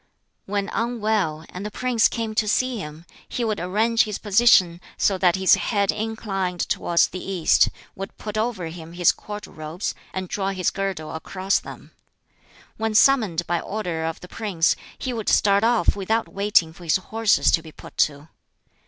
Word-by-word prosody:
When 200 0 -1
unwell, 215 -9 -1
and 180 - -7
the 210 - -4
prince 240 0 +2
came 225 -2 -4
to 215 0 +1
see 255 +2 +1
him, 155 -1 -8 0.2
he 245 - -2
would 215 -2 -1
arrange 220 +6 +2
his 210 -2 -4
position 190 -5 +4 0.2
so 195 -2 +2
that 180 -2 +4
his 190 0 +4
head 200 -3 +2
inclined 200 -5 -3
towards 170 -1 +2
the 185 - -7
east, 185 -4 +3 0.3
would 195 +1 -7
put 210 -1 -6
over 215 -4 -1
him 165 0 -10
his 175 -1 +4
Court 210 0 -8
robes, 155 +5 -5 0.2
and 185 0 -4
draw 195 +1 -2
his 185 -2 0
girdle 195 -6 -4
across 185 +4 -1
them. - - -11 0.9
When 220 0 -2
summoned 215 -10 +4
by 175 0 0
order 175 -6 -3
of 165 0 -4
the 180 - -10
prince, 190 -6 0 0.2
he 255 - -3
would 220 -3 -2
start 200 0 +4
off 230 -5 +3
without 220 +3 -1
waiting 200 -5 +2
for 175 - -14
his 165 - +2
horses 220 +3 +2
to 165 - +3
be 160 -1 -12
put - - -13
to. 145 +1 0
195 Hz, 175 wpm, -23 LUFS, 175-220 Hz, 0.9 s, position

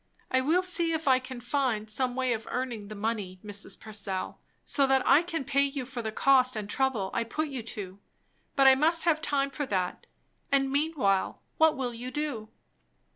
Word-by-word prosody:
"I 260 - +3
will 330 +7 +2
see 340 -3 0
if 320 -2 -3
I 260 -1 +5
can 255 -1 -8
find 245 -7 0
some 245 +3 +1
way 255 -2 +1
of 220 -1 -5
earning 240 -5 -3
the 215 - -8
money, 205 -3 -3
Mrs. 205 0 -5
Purcell, 205 -3 -5 0.3
so 275 -2 +2
that 265 -1 +3
I 300 - +6
can 335 -3 -3
pay 280 0 +2
you 275 -2 -1
for 250 -1 -5
the 220 -1 -3
cost 255 +1 +4
and 210 -2 -4
trouble 225 -5 -1
I - - 0
put 300 +7 -3
you 265 -3 -4
to. 200 -4 -8 0.6
But 275 - +4
I 265 - +9
must 320 +5 +3
have 315 -3 +2
time 275 -2 +1
for 285 0 -4
that; 185 -4 -2 0.4
and 270 -1 +2
meanwhile, 280 -10 0 0.2
what 320 -2 +5
will 250 -2 -2
you 240 +2 -6
do?" 255 -6 -4
260 Hz, 195 wpm, -28 LUFS, 220-285 Hz, 0.6 s, I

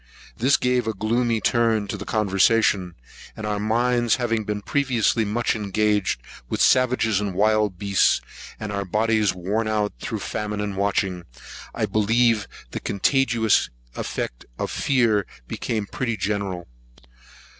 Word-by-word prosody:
This 130 +5 +3
gave 125 -2 +1
a 110 - -1
gloomy 115 +3 +1
turn 115 -3 +2
to - - -2
the 105 0 -7
conversation; 100 -3 +2 0.4
and 110 - -5
our 105 -1 -1
minds 120 +2 +2
having 115 -3 -1
been 105 0 -3
previously 125 -5 +1
much 115 +3 0
engaged 105 - 0 0.3
with - - -2
savages 120 -5 +3
and 100 -3 -3
wild 105 -2 +2
beasts, 100 0 +3 0.4
and 105 -1 -5
our 100 0 -2
bodies 105 +1 +1
worn 100 +5 -1
out 105 -1 0
through - - -4
famine 105 0 -3
and 105 -1 -3
watching, 95 -3 -1 0.5
I - - 0
believe 115 +1 +2 0.2
the - - -4
contagious 115 0 +2 0.3
effects - - -4
of - - -3
fear 115 -7 +2 0.2
became 110 -3 -3
pretty 115 +2 -3
general. 95 -2 -2
110 Hz, 135 wpm, -23 LUFS, 100-115 Hz, 0.5 s, This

